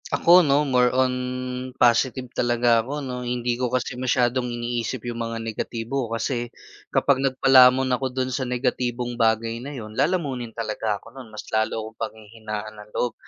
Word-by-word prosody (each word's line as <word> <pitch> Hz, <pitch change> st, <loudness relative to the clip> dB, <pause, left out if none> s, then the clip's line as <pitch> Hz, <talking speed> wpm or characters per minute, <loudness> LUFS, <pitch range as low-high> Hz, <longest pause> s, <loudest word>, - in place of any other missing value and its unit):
Ako, 175 Hz, +2 st, +6 dB
no 145 Hz, 0 st, +3 dB
more 125 Hz, -2 st, +3 dB
on 130 Hz, -1 st, +3 dB, 0.6 s
positive 125 Hz, +2 st, +3 dB
talaga 120 Hz, -1 st, +3 dB
ako 140 Hz, +6 st, -5 dB
noh. 125 Hz, -1 st, -4 dB
hindi 120 Hz, 0 st, -1 dB
ko 125 Hz, 0 st, -1 dB
kasi 125 Hz, 0 st, -1 dB
masyadong 125 Hz, 0 st, +1 dB
iniisip 120 Hz, 0 st, -3 dB
yung 120 Hz, -1 st, -4 dB
mga 115 Hz, 0 st, -4 dB
negatibo 115 Hz, +2 st, -3 dB
kasi 120 Hz, +1 st, -2 dB, 0.4 s
kapag 135 Hz, -2 st, +2 dB
nagpalamon 130 Hz, -1 st, +6 dB
ako 135 Hz, -, -3 dB
dun 130 Hz, 0 st, -2 dB
sa 140 Hz, -, -2 dB
negatibong 125 Hz, -1 st, -1 dB
bagay 115 Hz, 0 st, +1 dB
na 140 Hz, -, -6 dB
yun 110 Hz, -2 st, -8 dB
lalamunin 140 Hz, -5 st, 0 dB
talaga 110 Hz, -1 st, -2 dB
ako -, -, -16 dB
nun, 130 Hz, -4 st, -10 dB
mas 110 Hz, -, -8 dB
lalo 110 Hz, +1 st, +1 dB
akong 110 Hz, 0 st, -12 dB
panghihinaan 110 Hz, -1 st, -6 dB
ng 105 Hz, -, -14 dB
loob. 120 Hz, -2 st, 0 dB
120 Hz, 165 wpm, -24 LUFS, 115-130 Hz, 0.6 s, Ako